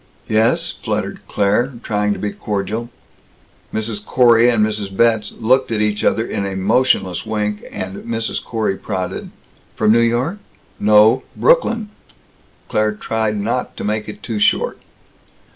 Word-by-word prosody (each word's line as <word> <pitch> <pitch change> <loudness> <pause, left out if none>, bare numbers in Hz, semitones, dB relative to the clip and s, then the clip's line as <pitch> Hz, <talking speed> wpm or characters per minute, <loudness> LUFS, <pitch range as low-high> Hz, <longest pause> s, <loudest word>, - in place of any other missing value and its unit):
"Yes," 110 +1 +2
fluttered - - -3
Claire, 105 +6 +1
trying 105 -1 0
to - - -6
be 105 - -3
cordial. 105 +4 -3 0.8
Mrs. 110 -1 -3
Corey 120 0 +5
and 110 -3 +3
Mrs. 105 -3 -4
Betz 115 -2 +2
looked 130 +3 +2
at 110 - 0
each 105 -1 0
other 115 - +2
in 100 - -3
a 100 -1 -3
motionless 95 -2 +1
wink, 105 -1 -2
and 95 +1 -5
Mrs. 115 -1 -3
Corey 110 -4 -1
prodded: 95 -3 -4 0.5
"From 110 0 +3
New 115 - +5
York?" 120 - +1 0.4
"No. 105 +4 +5
Brooklyn." 230 - +2 0.8
Claire 110 0 +1
tried 110 0 -2
not 115 +5 -2
to - - -5
make 105 +1 -2
it 105 - -10
too 110 -3 -3
short. - - +2
110 Hz, 145 wpm, -19 LUFS, 105-115 Hz, 0.8 s, Corey